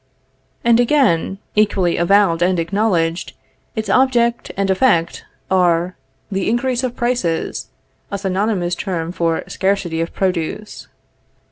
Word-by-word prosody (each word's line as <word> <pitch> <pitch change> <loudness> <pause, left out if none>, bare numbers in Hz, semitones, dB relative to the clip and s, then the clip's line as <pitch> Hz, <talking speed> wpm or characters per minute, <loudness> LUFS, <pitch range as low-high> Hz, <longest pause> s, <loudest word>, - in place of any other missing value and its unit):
And 235 0 +4
again, 240 - +2 0.2
equally 200 -5 +2
avowed 175 -1 +3
and 180 +1 +2
acknowledged, 170 -2 0 0.4
its 220 -2 -3
object 235 +1 +2
and 195 0 +1
effect 185 -5 +1 0.3
are, 180 -1 +2 0.4
the 195 0 -1
increase 245 +2 0
of 250 -2 -2
prices; 240 -10 -1 0.4
a 200 - -3
synonymous 190 -2 -1
term 175 -3 -3
for 165 -2 -1
scarcity 190 -4 -1
of 165 - -3
produce. 190 +3 -3
195 Hz, 115 wpm, -19 LUFS, 170-225 Hz, 0.4 s, And